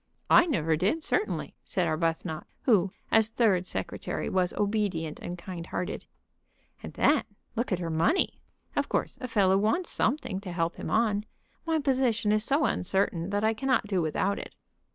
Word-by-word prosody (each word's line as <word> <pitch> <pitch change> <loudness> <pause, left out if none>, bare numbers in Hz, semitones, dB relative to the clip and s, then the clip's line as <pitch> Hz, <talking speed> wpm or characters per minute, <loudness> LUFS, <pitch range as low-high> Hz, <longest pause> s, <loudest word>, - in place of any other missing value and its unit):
"I 345 - +7
never 165 - +1
did, 205 - 0
certainly," 420 +5 -1
said 180 -2 0
Arbuthnot, 160 0 -1 0.2
who, 200 -7 +3 0.2
as 225 -1 +4
third 205 -6 +2
secretary, - - -3
was 185 -1 +2
obedient 200 -7 -1
and 175 - -6
kind 170 -1 -7
hearted. 180 - -4 0.8
"And - - -8
then 290 0 +3 0.3
look 235 +1 -1
at 185 - +2
her 170 -2 -3
money. 170 - +1 0.3
Of - - 0
course - - -1
a 255 - -3
fellow 195 -4 +3
wants 220 - +1
something 220 -6 0
to 195 -2 -7
help 170 -1 -1
him - - -5
on. 215 -2 +1 0.4
My 325 -1 +2
position 255 -7 +1
is 215 0 +2
so 280 +5 +2
uncertain 180 -2 0
that 205 +1 -1
I 220 +1 +3
cannot 260 0 +1
do 195 -3 0
without 180 +5 0
it." - - -9
200 Hz, 170 wpm, -28 LUFS, 175-230 Hz, 0.8 s, I